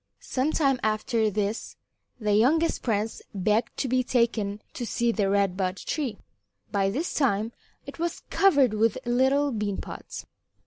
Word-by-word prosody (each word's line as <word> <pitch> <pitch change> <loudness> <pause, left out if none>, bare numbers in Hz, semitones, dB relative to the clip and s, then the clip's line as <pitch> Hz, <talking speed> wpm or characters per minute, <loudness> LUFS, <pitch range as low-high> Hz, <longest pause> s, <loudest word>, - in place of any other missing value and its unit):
Some 270 +4 -1
time 275 -5 +2
after 215 +1 +1
this 210 +2 -2 0.4
the 210 -2 +1
youngest 300 +10 +3
prince 220 -1 -1
begged 210 +4 0
to - - -1
be 255 +1 +2
taken 230 -5 0
to 245 - -5
see 235 0 0
the 205 -4 0
Red 200 -2 +2
Bud 185 -1 -1
Tree. 270 - -3 0.5
By 195 -2 +2
this 290 - -2
time 225 -5 +1 0.3
it - - -10
was 340 0 -2
covered 285 - +4
with 220 +2 +2
little 265 +4 +2
bean 210 -4 -2
pods. - - -7
230 Hz, 150 wpm, -26 LUFS, 205-265 Hz, 0.5 s, covered